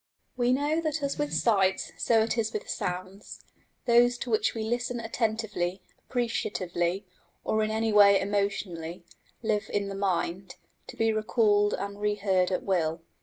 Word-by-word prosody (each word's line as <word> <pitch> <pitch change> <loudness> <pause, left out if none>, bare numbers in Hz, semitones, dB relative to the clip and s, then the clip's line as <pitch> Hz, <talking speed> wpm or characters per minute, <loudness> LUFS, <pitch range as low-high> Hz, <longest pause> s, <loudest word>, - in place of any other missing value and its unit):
We 245 -1 +2
know 295 +5 +1
that 310 -2 -2
as 280 +1 -2
with 295 0 -1
sights 195 -4 +2
so 225 -2 +3
it 225 - -1
is 225 -2 -1
with 215 - -4
sounds: 185 +3 -5 0.4
those 240 +1 +5
to 240 - -5
which 220 +1 +1
we 220 - -2
listen 240 +2 -2
attentively, 220 -5 -2 0.3
appreciatively, 195 -6 -1 0.4
or 220 - +1
in 215 - 0
any 220 0 0
way 200 -1 +7
emotionally, 190 -4 -2 0.4
live 215 -1 0
in 200 -1 -1
the - - -4
mind, 190 -1 -2 0.3
to - - -10
be 225 0 +2
recalled 215 -1 +2
and 200 0 -5
reheard 200 -3 +1
at 185 - -1
will. 165 -3 0
210 Hz, 155 wpm, -28 LUFS, 190-230 Hz, 0.4 s, way